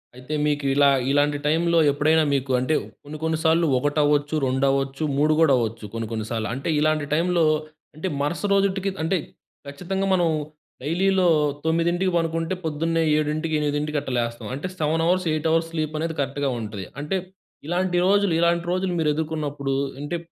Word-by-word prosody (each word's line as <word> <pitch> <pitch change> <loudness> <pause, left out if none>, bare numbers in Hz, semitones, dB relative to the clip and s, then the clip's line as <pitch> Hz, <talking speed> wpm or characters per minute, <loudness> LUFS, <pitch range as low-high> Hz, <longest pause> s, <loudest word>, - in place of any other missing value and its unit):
అయితే 125 +4 -7
మీకు 145 -1 0
ఇలా 145 0 +5 0.2
ఇలాంటి 145 +1 +2
టైంలో 170 +2 +2
ఎప్పుడైనా 155 +3 +3
మీకు 135 -1 -1
అంటే 130 +5 0 0.3
కొన్ని 150 +1 -8
కొన్ని 160 0 0
సార్లు 165 +1 +3
ఒకటవ్వచ్చు, 145 +2 +1
రెండవచ్చు, 135 +2 0
3 150 +2 +3
కూడా 155 -4 +5
అవ్వచ్చు 115 -2 -3
కొన్ని 115 -1 -3
కొన్ని 110 -2 -3
సార్లు. 110 -2 -2
అంటే 135 +5 -4
ఇలాంటి 155 -1 +1
టైంలో 170 +1 +2 0.5
అంటే 160 +5 -4
మరుస 150 +4 -1
రోజిటికి 195 0 +1
అంటే 185 +3 +1 0.5
ఖచ్చితంగా 180 +7 -3
మనం 175 -2 +3 0.5
డైలీలో 185 +5 +2 0.4
9:00కి 170 +3 +1
పడుకుంటే 165 +1 -1
పొద్దున్నే 165 +1 0 0.2
7:00కి, 155 +1 -1
8:00కి 150 +1 -1
అట్టా - - -6
లేస్తాం. 120 0 -3
అంటే 145 +8 -4
7 160 +1 0
అవర్స్, 185 +2 +2
8 155 +1 -1
అవర్స్ 165 0 +2
స్లీపనేది 155 0 -2
కరెక్ట్‌గా 140 0 -1
ఉంటది. 105 -4 -6
అంటే 150 +6 -1 0.5
ఇలాంటి 180 +1 0
రోజులు, 200 -2 +3
ఇలాంటి 170 0 +2
రోజులు 185 0 -1
మీరెదుర్కున్నప్పుడు 150 -3 -1 0.3
అంటే 160 +4 -3
155 Hz, 150 wpm, -23 LUFS, 145-170 Hz, 0.5 s, ఇలా